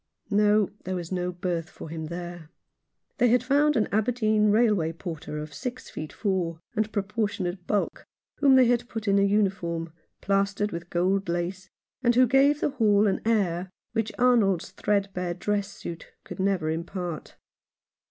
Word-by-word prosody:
No, 210 -1 +3
there 185 - -3
was 175 -1 -5
no 180 -1 -1
berth 175 -2 -3
for - - -10
him 160 0 -5
there. 175 -1 -7 0.7
They 245 - +5
had 245 +1 +3
found 290 +3 +3
an 215 - +2
Aberdeen 215 -1 +2
railway 205 -7 +3
porter 165 -3 -6
of 150 -1 -6
six 250 - -6
feet 155 - -6
four, 180 -5 -1 0.2
and 215 0 0
proportionate 200 -4 -2
bulk, 205 -2 -1 0.3
whom 275 -2 +5
they 260 -1 +7
had 240 0 +1
put 225 -1 -5
in 200 0 +4
a - - +4
uniform, 190 -5 0 0.3
plastered 200 +1 0
with 170 0 -6
gold 185 +2 +1
lace, 180 +2 -3 0.3
and 240 -2 +3
who 255 +1 +6
gave 275 +4 +4
the - - +1
hall 210 -4 +3
an 195 - +1
air 190 -5 +1 0.2
which 225 -1 -1
Arnold's 220 -8 +3
threadbare 190 -3 -1
dress 205 +2 -1
suit 170 -4 -8 0.2
could - - -9
never 185 -5 +1
impart. 170 0 -5
195 Hz, 160 wpm, -26 LUFS, 175-220 Hz, 0.7 s, they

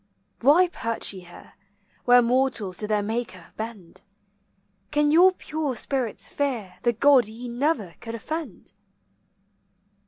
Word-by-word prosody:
Why 305 +9 +5
perch 230 -11 -3
ye 190 - -8
here, 175 -1 -14 0.5
Where 245 0 +6
mortals 235 -7 0
to 210 - -1
their 210 -1 +1
Maker 215 -5 -5
bend? 215 -6 -8 0.9
Can 295 +3 +2
your 355 +4 +7
pure 305 -6 -4
spirits 250 -1 -3
fear 245 -10 -3
The 240 - +2
God 255 0 +5
ye 230 +3 -8
never 240 - -1
could 230 -1 -7
offend? 315 +8 -6
240 Hz, 125 wpm, -25 LUFS, 215-285 Hz, 0.9 s, your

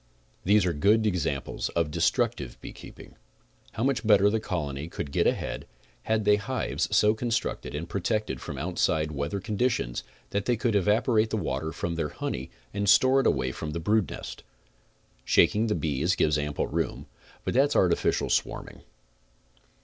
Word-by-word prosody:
These 105 +1 +4
are 90 - +1
good 105 +8 +3
examples 90 -8 -1
of 85 -3 +1
destrutive - - 0
beekeeping. - - -12 0.6
How 115 - -2
much 130 -4 +1
better 105 -2 +5
the 110 - +1
colony 75 -8 -4
could 75 -4 -6
get - - +2
ahead - - -2 0.4
had 110 -1 0
they 105 0 +5
hives 130 +5 -2
so 105 +1 +4
con 120 +2 -3
structed 115 -9 -2
and 80 +2 -5
protected 100 - -2
from - - -6
outside 75 -1 0
weather 75 +7 -3
conditions 105 - -1 0.3
that 100 0 -1
they 120 -1 +1
could 115 +1 0
evaporate 110 +3 +2
the 110 - -1
water 80 -4 -2
from 85 +1 -3
their 80 -3 -2
honey 65 -2 -4 0.2
and 100 -1 0
store 130 +6 +6
it - - +1
away 65 -2 +1
from 75 +3 -5
the 85 - -3
brood 105 +3 +1
nest. - - -7 0.8
Shaking 105 +6 +3
the 105 - +1
bees 80 +3 0
gives 75 -1 +2
ample 75 -1 -1
room, 70 - -3 0.4
but - - -1
that 135 +3 +4
is - - -2
artifical 90 -2 +2
swarming. - - -2
100 Hz, 165 wpm, -27 LUFS, 75-110 Hz, 0.8 s, store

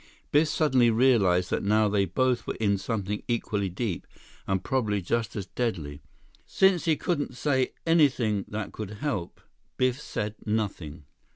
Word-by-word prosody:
Biff 150 +2 +4
suddenly 130 -6 +3
realized 110 -7 +3
that - - 0
now 105 +2 +3
they 100 -1 +2
both 125 +7 0
were - - -2
in 100 -3 +1
something 105 0 -3
equally 105 -4 -1
deep 90 0 -4 0.4
and 95 -1 0
probably 110 -6 0
just 110 +4 -2
as 100 - -3
deadly. 85 - -3 0.5
Since 190 -3 +3
he 160 -2 +3
couldn't 145 -7 -2
say 130 -1 +1
anything 130 - +3
that 110 0 -6
would 105 -3 -4 0.2
help, 95 -13 -3 0.4
Biff 130 +2 +1
said 105 -6 -4
nothing. 95 -8 -3
110 Hz, 150 wpm, -27 LUFS, 100-130 Hz, 0.5 s, Biff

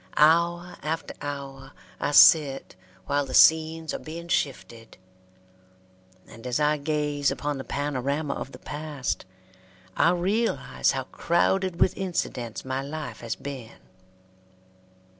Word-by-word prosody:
Hour 170 +3 +3
after 160 +2 -3
hour 140 -1 -7 0.3
I - - -1
sit 145 -2 +6 0.3
while 145 +5 +1
the 130 - -3
scenes 160 0 +5
are - - -3
being 170 +2 -8
shifted; 120 -7 -3 1.3
and 115 +2 -10
as 125 +3 0
I 150 0 +2
gaze 145 -1 0
upon 145 -2 -3
the - - -5
panorama 145 +1 -2
of - - -6
the - - -10
past, 145 -3 -4 0.7
I 165 - +4
realize 180 - 0
how 135 -1 -2
crowded 175 +5 0
with 185 - +3
incidents 130 - -3
my 130 +1 -2
life 140 -4 -6
has 115 -2 -4
been. 130 -5 -8
145 Hz, 120 wpm, -26 LUFS, 135-160 Hz, 1.3 s, sit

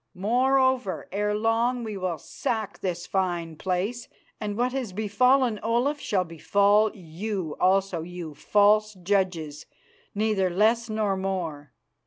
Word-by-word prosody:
Moreover, 255 +2 +1
ere 210 +2 0
long 230 +3 +1
we 215 -2 -5
will 185 -3 -2
sack 220 - -4
this 175 -2 -3
fine 175 -4 -1
place, 190 +8 -2 0.3
and 210 -1 -4
what 250 +1 +1
has 250 -7 -4
befallen 230 +3 +2
Olaf 240 +7 0
shall 190 -8 0
befall 200 +5 +3
you 180 -1 -5
also, 190 -2 +2
you 170 -2 -7
false 210 +5 +3
judges, 180 -5 -1 0.5
neither 205 -3 +1
less 225 +5 +2
nor 215 -2 0
more. 170 -8 -4
200 Hz, 125 wpm, -26 LUFS, 180-225 Hz, 0.5 s, befall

